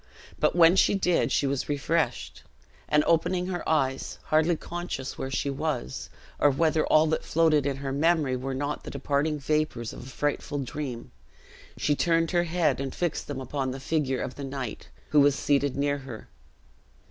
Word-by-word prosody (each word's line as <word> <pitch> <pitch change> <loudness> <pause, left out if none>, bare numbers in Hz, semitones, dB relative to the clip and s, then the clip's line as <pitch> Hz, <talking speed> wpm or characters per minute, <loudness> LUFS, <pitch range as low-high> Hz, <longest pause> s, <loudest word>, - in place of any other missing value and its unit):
But - - +2
when 170 0 +7
she 200 - +4
did, 180 -3 +1
she - - +2
was 140 0 -1
refreshed; 145 - -1 0.5
and 150 0 +4
opening 180 +2 +1
her 180 -1 -3
eyes 135 -4 0
hardly 160 +2 +2
conscious 170 -5 -5
where 135 - -4
she 135 +1 -1
was, 135 - -3 0.3
or 145 - +5
whether 155 +2 +2
all 155 +1 +5
that 160 0 0
floated 155 -3 +2
in 135 -1 -1
her 135 -1 -4
memory 150 -2 +2
were 130 +1 -3
not 145 +2 -3
the - - -7
departing 145 +2 -1
vapors 150 -5 -1
of 125 - -9
a - - -9
frightful 145 +1 -2
dream 135 -3 -5 0.7
she 150 - +1
turned 165 +1 +2
her 175 -1 +2
head 160 -5 +1
and 135 -1 -4
fixed 175 -3 -2
them 145 -2 -4
upon 130 +1 -3
the 130 +1 -5
figure 135 -2 -1
of - - -5
the 140 - -8
knight, 135 -4 -5 0.2
who 150 - +4
was 140 -1 +5
seated 140 -1 +1
near 145 0 0
her. 130 -5 -9
145 Hz, 180 wpm, -27 LUFS, 135-160 Hz, 0.7 s, when